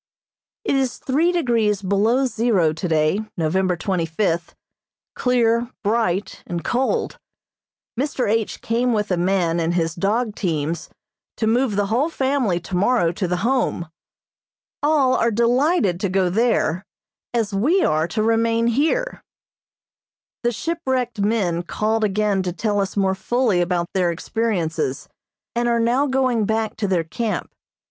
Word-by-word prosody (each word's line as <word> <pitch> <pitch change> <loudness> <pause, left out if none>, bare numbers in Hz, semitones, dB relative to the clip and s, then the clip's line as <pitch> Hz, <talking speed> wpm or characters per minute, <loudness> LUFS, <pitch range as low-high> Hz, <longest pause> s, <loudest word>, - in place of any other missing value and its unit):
It - - +1
is 265 -3 0
three 310 +7 +1
degrees 230 - +1
below 215 +7 +2
zero 220 -10 +1
today, 160 +2 +1 0.2
November 180 +2 +1
twenty 175 -1 -1
fifth, 170 0 -1 0.6
clear, 240 -1 +1
bright 205 -3 0
and 170 -2 -4
cold. 255 - -1 0.8
Mr. 275 -2 -1
H. 220 0 -1
came 240 +2 0
with 210 -2 -1
a - - +3
man 175 -2 +1
and 165 +1 0
his 165 -1 0
dog 210 +5 0
teams 160 -4 -2 0.5
to 220 - 0
move 235 0 +1
the 205 0 +1
whole 245 +10 +1
family 265 - 0
tomorrow 180 +2 +1
to 180 +2 -2
the 180 +2 -2
Home. 245 -10 0 0.9
All 290 -3 +3
are 230 - +2
delighted 235 - +2
to 195 - -1
go 185 -1 +1
there, 200 -5 +1 0.5
as 225 -4 -1
we 300 - +2
are 155 +1 +1
to 215 +6 -1
remain 230 +1 +2
here. 315 - 0 1.2
The 240 - +1
shipwrecked 255 -4 -2
men 200 -5 +1
called 215 +5 -1
again 205 -1 +1
to 185 -1 -2
tell 205 +3 -1
us 195 0 -2
more 190 -1 +2
fully 215 0 +1
about 175 -1 0
their 180 -2 +2
experiences, 170 - -2 0.5
and 240 0 +1
are 235 0 +2
now 245 +5 +2
going 255 -4 +1
back 220 0 -1
to 210 - -1
their 180 -3 +1
camp. 215 +7 -3
215 Hz, 140 wpm, -21 LUFS, 180-240 Hz, 1.2 s, a